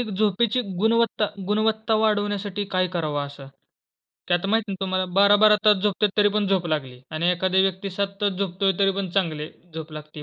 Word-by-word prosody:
एक 240 - -3
झोपेची 215 +3 +1 0.2
गुणवत्ता 225 0 +2 0.2
गुणवत्ता 220 +1 0
वाढवण्यासाठी 205 -2 -1
काय 185 0 +2
करावं 150 -5 -2
असं? 140 -1 -12 0.8
की 175 - +3
आता 175 +3 -1
माहिती 220 -1 0
ना - - -4
तुम्हाला, 185 -1 -1
12-12 205 +2 +6
तास 210 -1 +6
झोपत 205 -1 -1
आहेत. 205 - +3
तरीपण 205 0 +3
झोप 190 -2 0
लागली 135 -6 -3
आणि 165 +3 0
एखाद्या 185 +1 +1
व्यक्ती 195 +1 -2
7 200 +2 -2
तास 205 -1 +1
झोपतोय 195 0 -1
तरीपण 195 -1 +1
चांगली 160 -5 -2 0.2
झोप 160 -1 -7
लागती 150 0 -9
195 Hz, 175 wpm, -23 LUFS, 175-210 Hz, 0.8 s, 12-12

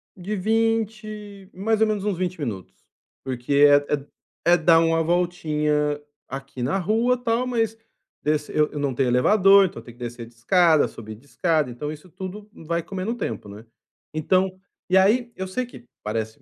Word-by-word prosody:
De 195 +3 -4
20, 215 -1 -2
mais 220 +3 0
ou - - +6
menos 210 -2 -1
uns 205 -4 -1
20 180 -1 -3
minutos, 110 -10 -5 0.5
porque 130 +1 -3
é 145 0 +7 0.2
é - - +6
d 140 - -12 0.4
é 175 - +6
dar 165 0 +5
uma 165 0 +2
voltinha 150 -4 0 0.3
aqui 135 -2 -6
na 150 +10 0
rua, 225 +7 +1
tal, 240 0 0
mas 225 -3 -1 0.5
desç 150 0 0
eu 150 0 +2
eu 145 - -5
não 140 -2 -1
tenho 130 -1 +1
elevador, 195 - +6
então 185 - -5
eu - - -19
tenho 120 -1 -13
que 125 - -8
descer 120 0 -6
de 115 - -18
escada, 160 +6 +4
subir 110 -1 -9
de 120 - -20
escada, 155 -1 0
então 135 +5 -5
isso 155 +4 -11
tudo 190 +4 -8
vai 170 +1 -3
comendo 190 +5 -4
tempo, 115 - -4
né. 105 +3 -11 0.5
Então 185 +4 +1 0.3
e 185 - +5
aí 235 +5 +3
eu 190 - -4
sei 250 +7 -2
que 180 - -14 0.2
parece, 110 +1 -4
175 Hz, 185 wpm, -24 LUFS, 145-205 Hz, 0.5 s, é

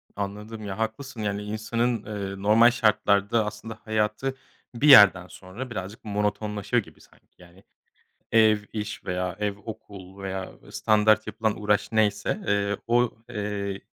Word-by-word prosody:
Anladım. 105 +2 -6
Ya, 95 -1 -5
haklısın, 110 +2 -4
yani, 100 0 -2
insanın, 110 +2 -2
eee, 100 -2 -5
normal 115 +3 +6
şartlarda 105 -1 +2
aslında 110 +1 -7
hayatı 110 +4 -1 0.4
bir 140 +6 +1
yerden 100 -9 +8
sonra 95 +9 -9
birazcık 105 0 -7
monotonlaşıyor 105 +2 -1
gibi - - -18
sanki. - - -23
Yani 90 +1 -18 0.7
ev, 110 -1 +5 0.2
iş 105 0 -5
veya 90 0 -2
ev, 105 -1 -2
okul 100 -3 -10
veya 95 -1 -4 0.2
standart 110 0 +3
yapılan 110 0 -2
uğraş 105 0 +1
neyse, 110 - +1
eee, 100 0 +1
o, 120 0 +3 0.2
eee, 100 -3 -4
105 Hz, 135 wpm, -25 LUFS, 100-110 Hz, 0.7 s, yerden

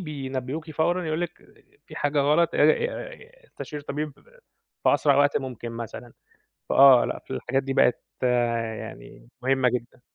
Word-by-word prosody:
بينبّهوكِ 140 -1 -5
فورًا 175 +4 0
يقولوا 155 +3 -1
لِك، 170 - -10 0.4
في - - -11
حاجة 145 0 0
غلط 150 +4 +3
آآ - - 0
آآ - - -1
استشير 150 - -8
طبيب 150 +1 -4 0.7
في - - +5
أسرع 140 -2 +3
وقت 145 0 +3
ممكن 125 -3 -7
مثلًا، 115 +1 -8 0.6
فآه، 135 -3 +7
لأ، - - -4
في - - -10
الحاجات 135 +2 -1
دي 135 0 -3
بقت 125 - +3 0.2
يعني 115 - -2
مهمة 130 0 +2
جدًا. 125 +1 -5
140 Hz, 150 wpm, -25 LUFS, 125-155 Hz, 0.7 s, فآه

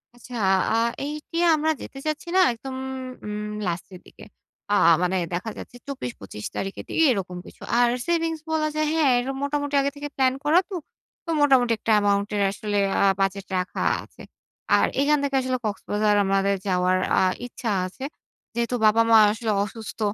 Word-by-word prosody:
আচ্ছা 245 +1 -11 0.4
আ - - +3 0.3
এইটি 300 +3 -6 0.2
আমরা 310 +1 +1
যেতে - - -9
চাচ্ছি 310 +1 -3
না - - +5
একদম 260 +3 -8 0.5
উম 210 0 -4 0.2
লাস্টের 175 +1 -5
দিকে। - - -15 0.5
আ - - +3 0.3
মানে 180 +1 +1 0.2
দেখা 180 +6 -2
যাচ্ছে - - -10
২৪ 255 - -4
২৫ 105 +1 -8
তারিখের 195 0 -4
দিকে 325 - +2
এরকম 185 -5 -3
কিছু। - - -15 0.2
আর 245 0 +5 0.2
সেভিংস 330 -1 0
বলা 310 -1 +1
যায় 310 0 +1
হ্যাঁ, 310 -4 +3
এরম 265 +2 -3
মোটামুটি 285 0 -1
আগে 280 - 0
থেকে 290 0 -5
প্ল্যান 260 -1 +3
করা 315 +4 +5
তো। 390 - -5 0.5
তো - - -9
মোটামুটি 260 -5 +4
একটা 225 - -2
অ্যামাউন্টের 205 0 +1
আসলে 205 0 -3 0.2
আ - - +2 0.2
বাজেট 195 0 0
রাখা 180 0 -3 0.2
আছে। - - -16 0.6
আর - - +3
এখান 295 +1 +3
থেকে 280 -1 -1
আসলে 255 0 -1
কক্সবাজার 210 +1 0
আমাদের 195 +1 +2
যাওয়ার 185 0 +2 0.2
আ - - +3 0.2
ইচ্ছা 235 -2 -4 0.2
আছে। 260 +8 -11 0.5
যেহেতু 235 +1 0
বাবা 215 +1 +5
মা 225 - +8
আসলে 225 0 -2
অসুস্থ। 220 +2 -8
235 Hz, 170 wpm, -24 LUFS, 200-285 Hz, 0.6 s, মা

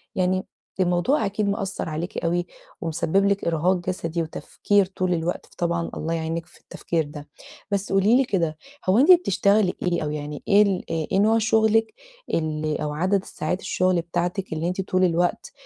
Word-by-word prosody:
يعني 185 0 +1 0.3
الموضوع 185 +9 +2
أكيد 205 +1 -1
مأثّر 200 -4 -3
عليكِ 160 +3 -4
أوي، 175 +1 0 0.4
ومسبب 165 +4 +1
لِك 200 0 +1
إرهاق 170 +3 +2
جسدي، 170 -2 -2
وتفكير 200 +5 0
طول 185 -1 -2
الوقت، 170 +1 -2
طبعًا 170 -1 -1
الله 165 +2 -2
يعينِك 165 0 -3
في - - -21
التفكير 165 -2 -2
ده، 145 0 -10 0.4
بس 200 0 -1
قولي 195 +5 +4
لي 270 - +4
كده، 165 -8 -1 0.3
هو 190 - +4
أنتِ 290 +7 +7
بتشتغلي 205 - +4
إيه؟ 175 -3 0
أو 150 - -2
يعني 150 -1 -5
إيه 205 -1 +6
ال 200 -3 0
إ 160 -2 -1
إيه 190 - +3
نوع 220 +2 +4
شغلِك 220 0 +2 0.4
ال 155 -1 -1
أو 150 -1 -2
عدد 185 +5 +1
الساعات 180 0 -4
الشغل 185 -2 +1
بتاعتِك، 175 +2 -3
اللي 160 +2 -2
أنتِ 185 +2 -1
طول 185 0 0
الوقت 175 - 0
180 Hz, 170 wpm, -24 LUFS, 165-200 Hz, 0.4 s, أنتِ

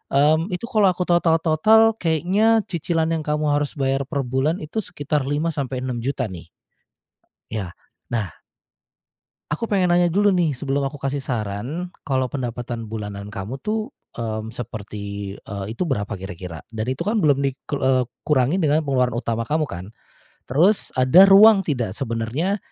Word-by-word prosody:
Mmm, 155 +4 +4
itu 180 0 -4
kalau 215 -4 +3
aku 180 0 +1
total-total 175 +6 +4
kayaknya 190 +7 +2
cicilan 165 -1 0
yang 165 - 0
kamu 150 0 0
harus 145 0 0
bayar 135 -1 0
per 140 -2 -2
bulan 130 +7 -1
itu 155 +9 -3
sekitar 145 -7 -2
Rp5.000.000-Rp6.000.000 135 -4 -2
nih. 85 -2 -10 1.0
Ya. 100 -5 -4 0.4
Nah 105 -8 -2 1.2
aku 225 +9 -2
pengen 185 -4 +2
nanya 175 0 +4
dulu 200 +4 +3
nih 165 -7 +1
sebelum 140 0 -1
aku 145 - -10
kasih 140 0 -2
saran, 125 - -4 0.2
kalau 130 -2 0
pendapatan 120 -3 -4
bulanan 105 -2 -6
kamu 105 +6 -6
tuh, 215 +6 -2 0.2
mmm, 110 -1 -3
seperti, 100 -4 -6
eee, 100 0 -7
itu - - 0
berapa 105 - -1
kira-kira? 90 -3 -8
Dan 110 +1 -3
itu 130 - -2
kan 215 +1 +1
belum 140 -4 +3
dikel 140 +2 -3
eee, 130 -1 +3 0.2
kurangin 150 +5 +2
dengan 150 +1 +3
pengeluaran 130 -4 +1
utama 115 -1 -2
kamu 155 +4 0
kan? 85 +1 -6 0.6
Terus, 175 - +3
ada 130 +10 +7
ruang 205 +1 +8
tidak 125 - -2
sebenarnya 130 - -2
140 Hz, 150 wpm, -22 LUFS, 115-170 Hz, 1.2 s, ruang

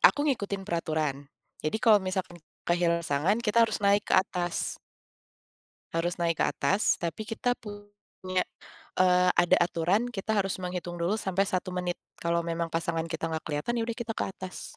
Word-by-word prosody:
Aku 290 +1 +6
ngikutin 200 -8 -1
peraturan, 155 -6 -2 0.3
jadi 155 +7 -1
kalau 220 -2 +5
misalkan 185 -2 -3 0.2
kehilangan 170 -1 +2
pasangan, 155 +8 +2
kita 215 +2 +2
harus 220 - -2
naik 200 +1 +4
ke - - +3
atas. 180 -2 0 1.1
Harus 170 +2 0
naik 170 -2 0
ke - - +5
atas, 195 +8 +2
tapi 170 +4 -3
kita 245 +2 0
punya, 205 -3 -5 0.6
eee, 180 0 +5
ada 175 0 +4
aturan 175 +6 +1
kita 215 +1 -1
harus 195 -2 0
menghitung 180 -1 -4
dulu 180 +6 +1
sampai 195 -1 0
1 185 -2 -2
menit. 180 -1 -2 0.2
Kalau 170 0 0
memang 170 0 -2
pasangan 165 0 -1
kita 160 0 -4
nggak 160 - -1
keliatan, 160 +11 -1
ya - - +1
udah 230 - -2
kita 235 -2 -3
ke - - -2
atas. 185 -1 -8
180 Hz, 165 wpm, -28 LUFS, 170-205 Hz, 1.1 s, Aku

